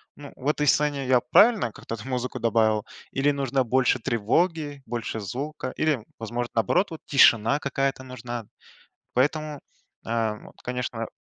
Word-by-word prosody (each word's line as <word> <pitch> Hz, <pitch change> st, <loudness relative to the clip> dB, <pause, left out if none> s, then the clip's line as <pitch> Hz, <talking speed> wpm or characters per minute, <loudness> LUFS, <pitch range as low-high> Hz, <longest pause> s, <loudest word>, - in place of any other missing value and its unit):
"Ну, 145 Hz, -1 st, -11 dB
в 135 Hz, -, -7 dB
этой 150 Hz, -1 st, 0 dB
сцене 145 Hz, -1 st, +2 dB
я 130 Hz, -1 st, +5 dB
правильно 200 Hz, -, +4 dB
как-то 115 Hz, -, -7 dB
там 110 Hz, +4 st, -10 dB
музыку 125 Hz, -1 st, -3 dB
добавил 110 Hz, -2 st, +2 dB, 0.3 s
или 140 Hz, +2 st, +2 dB
нужно 135 Hz, -1 st, 0 dB
больше 130 Hz, +1 st, +2 dB
тревоги, 145 Hz, -, 0 dB
больше 115 Hz, -1 st, -4 dB
звука 130 Hz, +6 st, -4 dB
или, 145 Hz, -8 st, +1 dB
возможно, 120 Hz, +2 st, -3 dB
наоборот, 115 Hz, -, +2 dB
вот 160 Hz, -, -8 dB
тишина 130 Hz, -1 st, +5 dB
какая-то 135 Hz, -1 st, -1 dB
нужна". 120 Hz, -2 st, -6 dB, 0.7 s
Поэтому, 150 Hz, +3 st, 0 dB, 0.5 s
а, 115 Hz, -1 st, 0 dB
вот, -, -, -14 dB
конечно 120 Hz, -2 st, -3 dB
130 Hz, 145 wpm, -25 LUFS, 115-145 Hz, 0.7 s, я